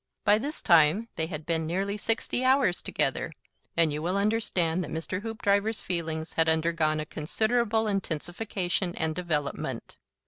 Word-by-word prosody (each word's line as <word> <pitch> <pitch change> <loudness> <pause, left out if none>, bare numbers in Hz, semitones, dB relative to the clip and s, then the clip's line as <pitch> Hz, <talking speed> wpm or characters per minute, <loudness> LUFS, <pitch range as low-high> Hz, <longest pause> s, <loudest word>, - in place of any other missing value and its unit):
By 210 +1 +5
this 290 +6 -5
time 170 +6 +5
they 160 - -1
had 155 -2 -6
been 160 -1 0
nearly 195 +4 -1
sixty 225 +3 0
hours 260 -8 +3
together, - - -1 0.5
and 165 -3 +4
you 150 - -3
will 180 +4 0
understand 190 -5 +1
that - - -6
Mr. 165 +4 -3
Hoopdriver's 215 -1 0
feelings 160 -2 -3
had 165 0 +3
undergone 160 -1 +1
a 155 - -3
considerable 220 +8 0
intensification 180 -1 -2
and 160 -1 -1
development. 155 -4 -3
175 Hz, 145 wpm, -28 LUFS, 160-210 Hz, 0.5 s, By